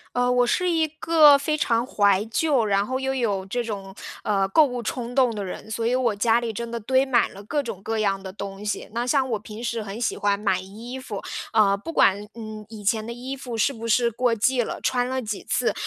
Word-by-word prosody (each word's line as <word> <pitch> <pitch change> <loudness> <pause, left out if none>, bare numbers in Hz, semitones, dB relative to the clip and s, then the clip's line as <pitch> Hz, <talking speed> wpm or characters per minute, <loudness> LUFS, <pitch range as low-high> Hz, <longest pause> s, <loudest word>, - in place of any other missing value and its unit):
呃， 245 0 +2
我 250 0 +3
是 360 +9 +1
一 325 -2 +2
个 310 -3 +7
非 305 +2 -1
常 235 -5 +1
怀 205 -4 +3
旧， 255 0 +1
然 200 -1 +2
后 260 +3 -2
又 265 0 -1
有 205 -6 -1
这 240 +5 -2
种， 195 -4 -6 0.3
呃， 195 -2 +1
购 305 +10 +6
物 245 -3 -4
冲 245 +1 -4
动 255 -4 +3
的 205 -2 -4
人。 200 +3 -8
所 230 +1 -1
以 245 - +2
我 250 -3 +1
家 225 +3 +2
里 235 -1 -2
真 235 +2 -5
的 235 - -4
堆 260 +4 +2
满 250 -3 +2
了 200 - -10
各 290 +6 -1
种 225 -7 -6
各 225 +2 -2
样 195 -2 0
的 190 -1 -8
东 200 0 -7
西， 210 - -3
那 235 +2 -2
像 265 0 +2
我 220 -3 -1
平 215 +2 -9
时 235 -1 -2
很 210 +2 -6
喜 245 - -1
欢 205 -1 +1
买 200 -3 +1
衣 225 +7 -8
服， 220 -6 -6 0.3
呃， 205 -3 +4
不 330 +12 -7
管， 205 -6 +3
嗯， 215 -2 -8
以 215 -1 -10
前 215 +1 +1
的 235 - -5
衣 255 +3 -6
服 245 -3 -6
是 225 - +2
不 230 -3 -7
是 235 +1 +3
过 235 +1 +1
季 245 +3 +2
了， - - -6
穿 245 -1 +1
了 260 +1 -2
几 215 -4 -5
次， - - +1
230 Hz, 260 characters per minute, -24 LUFS, 205-255 Hz, 0.3 s, 个